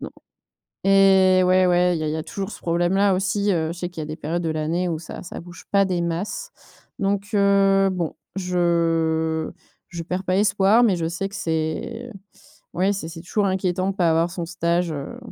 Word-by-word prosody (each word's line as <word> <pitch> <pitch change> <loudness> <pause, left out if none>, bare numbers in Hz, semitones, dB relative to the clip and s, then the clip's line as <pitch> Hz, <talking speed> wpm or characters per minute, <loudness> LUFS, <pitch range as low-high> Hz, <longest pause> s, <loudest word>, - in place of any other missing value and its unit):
Non - - -6 0.7
et 190 -1 +5
ouais, 185 0 +4
ouais, 180 0 +3
il - - -4
y 155 - -2
a - - -1
il 150 - -1
y - - -2
a 160 - -3
toujours 195 +4 -5
ce - - -9
problème-là, 175 +4 +2
aussi, 200 +2 0
heu, 160 -3 0
je 170 - -10
sais 175 - -3
qu'il 175 - -8
y - - -3
a - - -8
des 155 - -6
périodes 165 +2 -3
de 165 - -1
l'année 160 +3 -1
où 160 - -2
ça 165 - -9
ça 180 - -8
bouge 175 0 -12
pas 200 -1 +5
des 180 -2 -1
masses. 195 - -3 0.5
Donc 200 0 -1
heu, 195 -1 +4
bon, 175 -3 -3 0.2
je 165 -3 0 0.4
je 170 -1 -6
perds 180 +2 -3
pas 185 +1 +1
espoir, 200 +2 +4
mais 200 -6 +3
je 165 -1 -2
sais 185 +4 -3
que - - -12
c'est 165 +9 -3 0.6
ouais, 190 +3 +2
c'est 190 -5 -4
c'est 165 0 -9
toujours 200 +3 0
inquiétant 185 0 0
de - - -5
pas 175 -4 +3
avoir 165 +2 +2
son 175 -2 -4
stage, 170 0 0
heu 145 +11 -6
180 Hz, 215 wpm, -23 LUFS, 165-195 Hz, 0.7 s, et